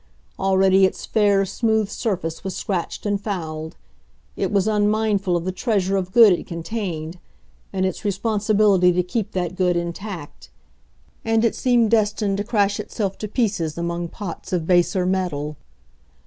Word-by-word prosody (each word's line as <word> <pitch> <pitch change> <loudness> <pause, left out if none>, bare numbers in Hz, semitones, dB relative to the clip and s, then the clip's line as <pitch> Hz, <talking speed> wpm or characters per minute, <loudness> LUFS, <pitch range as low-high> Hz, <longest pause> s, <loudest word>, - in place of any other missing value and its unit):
Already 190 0 +4
its 190 - -2
fair, 205 -3 +3
smooth 220 +1 0
surface 185 -6 -3
was 190 -2 -4
scratched 185 0 -3
and 205 -1 0
fouled. 160 -6 -5 0.6
It 195 - -1
was 200 0 +2
unmindful 210 -3 +1
of 170 - -5
the 185 - -1
treasure 195 -1 0
of 185 -1 -2
good 225 -2 +7
it 175 - -4
contained, 170 -2 -5 0.5
and 190 -1 0
its 185 - -3
responsibility 205 -2 +2
to 180 +1 +1
keep 215 +3 -3
that 180 -2 -2
good 180 -2 +1
intact. 170 -1 -6 0.7
And 225 0 +2
it 230 - +2
seemed 240 -3 +2
destined 210 -2 +1
to 205 - -1
crash 205 -2 +1
itself 195 -3 -3
to 215 - -4
pieces 195 - -1
among 170 0 -2
pots 175 0 -7
of 175 -3 0
baser 180 +1 +2
metal. 175 -6 -1
195 Hz, 150 wpm, -22 LUFS, 175-210 Hz, 0.7 s, good